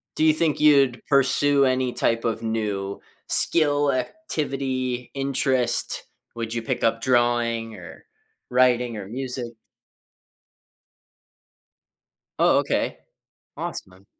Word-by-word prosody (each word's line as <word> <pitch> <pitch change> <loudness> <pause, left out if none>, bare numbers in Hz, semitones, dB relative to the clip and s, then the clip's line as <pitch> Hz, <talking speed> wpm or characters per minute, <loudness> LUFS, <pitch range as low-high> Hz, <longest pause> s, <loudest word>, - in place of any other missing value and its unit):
Do 155 - +2
you 155 - +6
think 155 -1 0
you'd 140 -5 +4
pursue 140 0 +3
any 130 -1 +1
type 115 0 0
of 115 -1 -1
new 105 -3 -3 0.3
skill, 145 -3 +2
activity, 130 - -3
interest? 135 -2 0 0.3
Would 115 -1 -4
you 115 - -2
pick - - -3
up 115 0 +1
drawing, 120 -2 +1
or 90 -3 -12 0.4
writing, 125 -2 +2
or 100 -2 -7
music? 125 0 -5 2.9
Oh, - - +4
okay. - - -1 0.6
Awesome. 95 +1 -7
125 Hz, 100 wpm, -24 LUFS, 115-140 Hz, 2.9 s, you